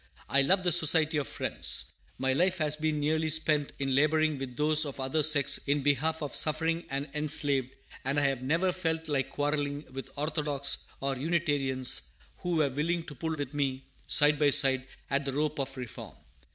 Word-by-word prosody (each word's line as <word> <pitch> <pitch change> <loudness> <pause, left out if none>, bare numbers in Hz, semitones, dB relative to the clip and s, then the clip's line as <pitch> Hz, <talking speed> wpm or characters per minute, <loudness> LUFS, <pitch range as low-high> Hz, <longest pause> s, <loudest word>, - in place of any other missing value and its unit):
I 140 - +4
love 185 +7 +2
the 175 - +2
Society 160 -1 +4
of 145 - -2
Friends. - - -1 0.3
My 130 0 0
life 180 +6 +1
has 155 -2 +1
been 155 0 -1
nearly 155 +2 0
spent 155 -2 +2
in 135 -1 -1
laboring 155 +1 +2
with 130 -2 -7
those 155 +1 +4
of 140 -2 -6
other 135 +4 0
sects 145 -2 +5
in 140 0 +1
behalf 150 +3 0
of 145 - -4
the - - +2
suffering 165 +2 0
and 140 +1 -3
enslaved; 145 -4 0 0.3
and 140 +2 0
I - - +1
have 135 -2 0
never 165 +8 +1
felt 160 -3 -2
like 140 -4 -1
quarrelling 145 0 -2
with 135 0 -7
Orthodox 145 -2 -1 0.2
or 135 0 -1
Unitarians, 140 - 0 0.4
who 175 -1 -3
were 155 -3 +2
willing 165 +5 -1
to 150 - -10
pull 160 +4 -4
with 145 -2 -5
me, 135 -2 -2 0.2
side 145 -1 +3
by 145 -1 +4
side, 135 -1 +3 0.2
at 140 +1 +1
the 135 -1 -4
rope 150 +1 -1
of 135 0 -4
Reform. 125 -5 -8
145 Hz, 190 wpm, -29 LUFS, 135-155 Hz, 0.4 s, sects